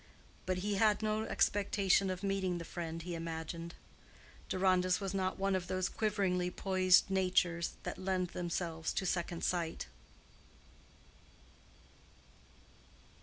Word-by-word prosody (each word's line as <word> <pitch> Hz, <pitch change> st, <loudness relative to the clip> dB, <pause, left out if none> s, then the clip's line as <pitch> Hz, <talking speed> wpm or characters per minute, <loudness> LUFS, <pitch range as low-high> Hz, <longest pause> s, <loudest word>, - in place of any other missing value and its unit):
But 185 Hz, -1 st, +1 dB
he 205 Hz, -1 st, 0 dB
had 215 Hz, +1 st, +3 dB
no 215 Hz, 0 st, 0 dB
expectation 195 Hz, -2 st, +2 dB
of 185 Hz, +1 st, -4 dB
meeting 195 Hz, -2 st, 0 dB
the 170 Hz, -, -6 dB
friend 165 Hz, -1 st, -5 dB
he 175 Hz, 0 st, -5 dB
imagined. 165 Hz, 0 st, -5 dB, 0.7 s
Deronda's 185 Hz, -1 st, +3 dB
was 195 Hz, -1 st, -3 dB
not 185 Hz, -1 st, -1 dB
one 195 Hz, 0 st, +1 dB
of 180 Hz, -1 st, -2 dB
those 185 Hz, 0 st, 0 dB
quiveringly 190 Hz, -4 st, 0 dB
poised 185 Hz, 0 st, +3 dB
natures 180 Hz, -3 st, +1 dB
that -, -, -5 dB
lend 185 Hz, -1 st, 0 dB
themselves 170 Hz, -2 st, -3 dB
to 190 Hz, -, -1 dB
second 175 Hz, -1 st, -2 dB
sight. 170 Hz, -3 st, -1 dB
185 Hz, 120 wpm, -34 LUFS, 175-195 Hz, 0.7 s, had